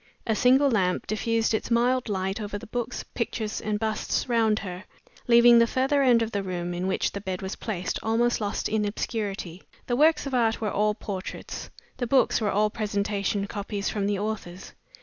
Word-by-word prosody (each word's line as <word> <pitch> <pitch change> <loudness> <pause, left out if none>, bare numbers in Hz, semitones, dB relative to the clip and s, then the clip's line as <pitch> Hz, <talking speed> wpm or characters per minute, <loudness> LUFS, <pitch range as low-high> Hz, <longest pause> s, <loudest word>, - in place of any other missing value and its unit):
A 225 - +1
single 265 +4 +4
lamp 185 -5 +1
diffused 225 +1 0
its 220 - -1
mild 245 +1 +2
light 195 +1 -2
over 205 0 -4
the - - -10
books, 240 +1 -4
pictures, 220 -2 -3
and 210 -1 -1
busts 220 +3 -1
round 225 -3 +2
her, 185 -1 -6 0.4
leaving 235 0 +7
the 230 - +5
further 270 +4 +1
end 245 -4 +5
of 225 - -4
the 200 - -1
room, 175 -2 -3
in 180 +2 -2
which 190 - 0
the 200 - -6
bed 190 -1 -4
was 190 - -4
placed, 185 -5 -3
almost 230 +1 +1
lost 205 -1 -1
in 215 -1 0
obscurity. 205 -4 -3 0.2
The 245 - 0
works 300 +2 +4
of 275 - -5
art 230 -3 +2
were 215 -2 -2
all 210 +1 +1
portraits; 195 -3 -6 0.3
the 245 - -2
books 260 -2 +3
were 210 - +1
all 210 +1 +2
presentation 200 -1 -1
copies 205 0 -3
from 200 -2 -1
the 205 -1 0
authors. 200 -3 -5
215 Hz, 190 wpm, -26 LUFS, 200-235 Hz, 0.4 s, leaving